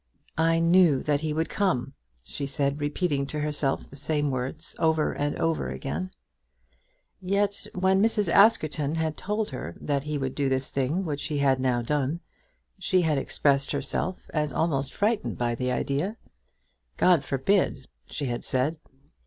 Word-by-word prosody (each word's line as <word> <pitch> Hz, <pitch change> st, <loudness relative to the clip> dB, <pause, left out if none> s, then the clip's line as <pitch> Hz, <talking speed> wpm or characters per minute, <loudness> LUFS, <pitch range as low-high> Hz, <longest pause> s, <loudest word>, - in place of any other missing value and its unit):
"I 165 Hz, 0 st, +3 dB
knew 165 Hz, -4 st, +4 dB
that 145 Hz, -1 st, +1 dB
he 155 Hz, -1 st, -1 dB
would 160 Hz, +2 st, 0 dB
come," 140 Hz, -10 st, 0 dB, 0.3 s
she 140 Hz, -, -4 dB
said, 140 Hz, +1 st, 0 dB
repeating 145 Hz, -2 st, 0 dB
to 150 Hz, -, -4 dB
herself 150 Hz, -2 st, -1 dB
the -, -, -13 dB
same 145 Hz, 0 st, 0 dB
words, 130 Hz, +5 st, -4 dB
over 160 Hz, -1 st, +2 dB
and 145 Hz, 0 st, -2 dB
over 165 Hz, -, 0 dB
again. 75 Hz, +7 st, -4 dB, 1.1 s
Yet 200 Hz, +2 st, 0 dB
when 190 Hz, +1 st, +3 dB
Mrs. 210 Hz, -2 st, +3 dB
Askerton 160 Hz, -6 st, +3 dB
had 160 Hz, -1 st, -1 dB
told 210 Hz, 0 st, -2 dB
her 85 Hz, -10 st, -6 dB
that 140 Hz, -1 st, -1 dB
he 150 Hz, 0 st, -2 dB
would 135 Hz, -2 st, -2 dB
do 140 Hz, -2 st, 0 dB
this 130 Hz, 0 st, 0 dB
thing 145 Hz, +8 st, 0 dB
which 145 Hz, -3 st, -3 dB
he 150 Hz, -2 st, -2 dB
had 135 Hz, -2 st, +3 dB
now 125 Hz, -2 st, +1 dB
done, 145 Hz, +4 st, -1 dB, 0.6 s
she 185 Hz, -1 st, +2 dB
had 155 Hz, -4 st, +2 dB
expressed 140 Hz, +1 st, +1 dB
herself 145 Hz, +6 st, -2 dB
as 150 Hz, -2 st, 0 dB
almost 140 Hz, -3 st, 0 dB
frightened 215 Hz, +1 st, 0 dB
by 120 Hz, -1 st, 0 dB
the 125 Hz, +2 st, -1 dB
idea. 145 Hz, -, -1 dB, 0.8 s
"God 175 Hz, -6 st, +4 dB
forbid," 135 Hz, 0 st, 0 dB, 0.2 s
she 145 Hz, -, -3 dB
had 120 Hz, -2 st, -3 dB
said. 140 Hz, +5 st, 0 dB
150 Hz, 160 wpm, -27 LUFS, 135-165 Hz, 1.1 s, knew